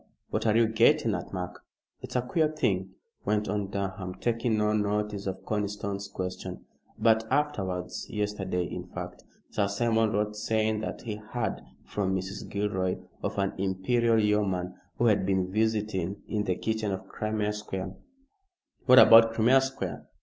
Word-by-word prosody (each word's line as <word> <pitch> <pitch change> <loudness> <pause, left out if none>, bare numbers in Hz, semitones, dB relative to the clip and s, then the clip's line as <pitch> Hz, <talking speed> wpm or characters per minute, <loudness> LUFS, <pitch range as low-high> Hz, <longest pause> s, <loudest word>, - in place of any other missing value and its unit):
What - - 0
are 110 +1 +4
you 115 -1 +5
getting 110 0 +4
at, - - -4
Mark?" 90 -1 -5 0.4
"It's - - -8
a 125 - +2
queer 155 +5 +2
thing," 95 -11 -1 0.3
went 105 +1 0
on 105 0 -1
Durham, 95 -2 -4
taking 115 0 0
no 105 0 +2
notice 105 -1 -1
of 95 0 -5
Conniston's 100 -1 -2
question, 95 -1 -5 0.3
"but 110 0 +3
afterwards 100 -11 -1
yesterday, 100 -4 -1
in 90 +1 -6
fact 90 0 -7 0.3
Sir 100 -2 +1
Simon 110 +1 +2
wrote 105 0 0
saying 110 0 0
that 110 - -5
he 110 -4 -4
heard 110 +2 -3 0.2
from 95 -2 -1
Mrs. 95 +2 -5
Gilroy 95 -2 -1 0.2
of - - -3
an 100 -1 0
Imperial 115 +5 +2
Yeoman 100 -4 +1 0.2
who 120 - +2
had 105 -4 +4
been 95 -1 0
visiting 105 -3 -1
in 105 -2 -1
the 90 - +1
kitchen 110 0 -1
of 95 0 -5
Crimea 110 -1 -2
Square 95 -2 -5 0.4
" 385 -1 -43
"What 130 0 +8
about 115 -2 +9
Crimea 125 +4 +5
Square?" 135 0 -4
105 Hz, 155 wpm, -28 LUFS, 95-110 Hz, 0.4 s, about